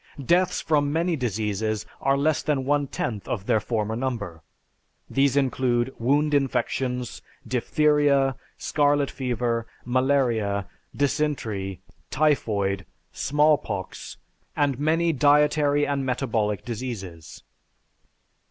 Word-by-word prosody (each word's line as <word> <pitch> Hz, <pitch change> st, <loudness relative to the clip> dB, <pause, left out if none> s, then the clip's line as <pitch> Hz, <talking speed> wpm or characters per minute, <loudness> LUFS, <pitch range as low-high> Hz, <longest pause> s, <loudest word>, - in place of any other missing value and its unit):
Deaths 180 Hz, +4 st, +2 dB
from 145 Hz, -2 st, +1 dB
many 165 Hz, +2 st, +1 dB
diseases 110 Hz, -3 st, -2 dB, 0.2 s
are 135 Hz, +1 st, +2 dB
less 150 Hz, +2 st, +1 dB
than 140 Hz, -3 st, -1 dB
one 145 Hz, 0 st, +1 dB
tenth 110 Hz, -5 st, -4 dB
of 100 Hz, -4 st, -3 dB
their 110 Hz, -, +3 dB
former 110 Hz, 0 st, -2 dB
number. 110 Hz, -10 st, -4 dB, 0.7 s
These 135 Hz, 0 st, +2 dB
include 130 Hz, -2 st, +1 dB
wound 145 Hz, +5 st, +2 dB
infections, 130 Hz, -3 st, -1 dB, 0.3 s
diphtheria, 140 Hz, +1 st, +2 dB, 0.2 s
scarlet 145 Hz, -1 st, +1 dB
fever, 120 Hz, -3 st, -2 dB, 0.2 s
malaria, 120 Hz, -6 st, +1 dB, 0.3 s
dysentery, 135 Hz, -, -1 dB, 0.3 s
typhoid, 105 Hz, -, +1 dB, 0.2 s
small 150 Hz, +1 st, +3 dB
pox, 95 Hz, -9 st, -6 dB, 0.4 s
and 140 Hz, -3 st, +1 dB
many 165 Hz, +3 st, +2 dB
dietary 145 Hz, +1 st, +3 dB
and 140 Hz, -1 st, -1 dB
metabolic 115 Hz, -6 st, -1 dB
diseases. 105 Hz, -9 st, -6 dB
130 Hz, 100 wpm, -25 LUFS, 110-145 Hz, 0.7 s, their